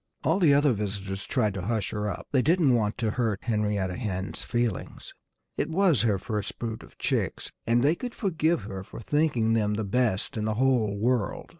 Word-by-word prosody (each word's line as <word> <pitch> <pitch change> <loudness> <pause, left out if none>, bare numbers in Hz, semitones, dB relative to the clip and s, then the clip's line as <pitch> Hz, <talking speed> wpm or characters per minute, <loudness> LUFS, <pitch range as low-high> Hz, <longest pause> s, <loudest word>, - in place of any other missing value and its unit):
All 165 +5 +2
the 165 -6 +5
other 145 -2 +4
visitors 100 -2 -4
tried 110 -7 +1
to 95 - -4
hush 110 0 -1
her 105 0 -2
up. - - -5
They 130 - +3
didn't 160 -3 +3
want 110 -3 +1
to 110 -3 0
hurt 110 -4 -1
Henrietta 105 -4 0
Hen's 95 -5 -4
feelings. 120 -5 -3 0.4
It - - -1
was 170 - +3
her 110 -3 +2
first 105 0 -4
brood 115 -2 -4
of - - -16
chicks; - - -1 0.2
and 120 +1 +3
they 145 +3 +4
could 245 +7 -6
forgive 170 - +1
her 95 -2 -6
for 95 - -10
thinking 120 -3 +1
them 105 -2 +1
the 110 - -2
best 110 -1 0
in 105 - -1
the 110 0 0
whole 120 -5 +2
world. 120 +1 0
110 Hz, 195 wpm, -27 LUFS, 105-130 Hz, 0.4 s, the